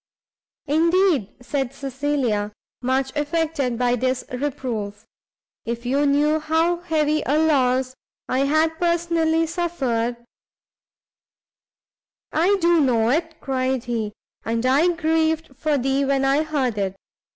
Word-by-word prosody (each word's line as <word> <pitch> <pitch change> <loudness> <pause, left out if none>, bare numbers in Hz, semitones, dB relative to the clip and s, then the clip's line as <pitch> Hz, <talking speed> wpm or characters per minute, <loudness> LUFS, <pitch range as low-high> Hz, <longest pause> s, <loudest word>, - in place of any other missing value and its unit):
"Indeed," 330 - +2
said 270 +1 -2
Cecilia, 265 -6 -1 0.3
much 265 +2 -1
affected 295 -4 -1
by 245 0 +2
this 255 +1 -1
reproof, 240 -6 -4 0.6
"if 235 +1 -5
you 280 +4 +2
knew 295 +2 +2
how 320 +3 +1
heavy 310 -3 0
a 290 +3 +2
loss 260 -5 +2 0.3
I 255 - 0
had 315 +2 +1
personally 335 -1 +1
suffered 265 -9 -1 1.5
" - - -74 0.5
"I 365 +6 +3
do 340 0 +4
know 235 -6 +2
it," 325 +2 -1
cried 260 -2 -1
he, 225 -4 -3 0.3
"and 230 +2 -1
I 275 +7 +4
grieved 320 -3 0
for 300 +2 0
thee 270 +2 +1
when 270 0 +1
I 275 +3 +3
heard 275 -8 -1
it. 195 -1 -1
280 Hz, 120 wpm, -22 LUFS, 250-320 Hz, 1.5 s, do